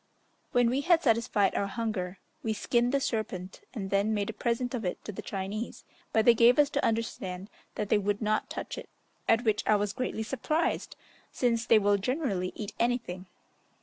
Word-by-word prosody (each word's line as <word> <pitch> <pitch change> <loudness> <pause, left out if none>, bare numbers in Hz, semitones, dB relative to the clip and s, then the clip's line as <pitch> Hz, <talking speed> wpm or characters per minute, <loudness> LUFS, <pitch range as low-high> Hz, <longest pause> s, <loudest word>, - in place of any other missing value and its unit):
When 245 -2 +3
we 265 +3 +1
had 340 +2 +4
satisfied 225 -5 +2
our 200 - 0
hunger, 195 -4 -3 0.2
we 220 - -1
skinned 240 +3 +1
the 280 - +2
serpent 210 - -3
and 195 -4 -4
then 200 +2 +2
made 205 +1 -1
a - - -16
present 240 +2 -1
of 240 -3 -2
it 180 - -3
to - - -4
the 190 - -7
Chinese; 200 +4 -4 0.3
but 220 -1 +3
they 240 - +8
gave 235 +2 +6
us 290 -1 +4
to 285 - 0
understand 200 -4 -2 0.2
that 210 -1 -3
they 210 - +4
would 205 0 0
not 215 -1 0
touch - - -5
it, - - -11 0.4
at 225 +1 +4
which 215 -3 +2
I 215 - +5
was 205 -1 0
greatly 235 -2 -2
surprised, 290 +7 -1 0.4
since 235 -1 0
they 225 - +7
will 205 -1 +3
generally 200 - -1
eat 210 -1 -6
anything. 230 -7 -1
220 Hz, 190 wpm, -29 LUFS, 200-240 Hz, 0.4 s, they